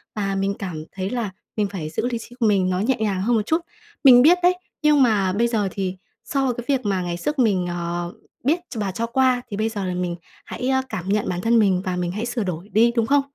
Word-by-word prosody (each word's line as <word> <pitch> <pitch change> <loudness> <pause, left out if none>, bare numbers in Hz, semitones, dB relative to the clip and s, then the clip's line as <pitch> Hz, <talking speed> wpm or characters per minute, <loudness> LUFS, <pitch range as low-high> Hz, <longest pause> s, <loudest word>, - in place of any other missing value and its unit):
và 195 -2 -1
mình 195 +1 0
cảm 170 -5 -5
thấy 190 0 -4
là 235 -3 -2 0.3
mình 210 -1 +2
phải 180 -6 -5
giữ 160 +9 -2
lý 240 -2 -2
trí 235 +1 -11
của 235 - +2
mình 195 -3 +2
nó 180 0 0
nhẹ 245 +7 +2
nhàng 200 -4 0
hơn 235 +5 +2
một 215 -2 0
chút. 320 +6 +1 0.4
Mình 250 -3 +9
biết 335 +7 +6
đấy, 360 - +6 0.3
nhưng 300 -2 +4
mà 200 -6 +2
bây 230 +4 +2
giờ 215 -4 0
thì 190 -1 -3 0.3
so 265 +1 0
cái 240 0 -7
việc 265 -4 0
mà 195 -2 0
ngày 175 -1 -3
xước 295 - -2
mình, 195 -7 +2
ờ, 175 0 -3 0.3
biết 310 +7 +2
ch - - -9
và 200 -2 -1
cho 230 +5 -2
qua, 255 +1 +2
thì 200 - -4
bây 220 +1 0
giờ 205 -3 -4
là 180 - -2
mình 180 -1 -2 0.3
hãy 255 +1 -3 0.2
cảm 195 -5 -5
nhận 205 +1 +1
bản 180 0 -2
thân 230 +3 +3
mình 190 -4 +3
và 185 -1 -1
mình 175 -1 -2
hãy 215 +5 -3
sửa 240 -2 -2
đổi 180 +1 -5
đi, 225 +4 +4
đúng 230 -2 +2
không? 285 +2 +4
210 Hz, 260 wpm, -22 LUFS, 185-240 Hz, 0.4 s, Mình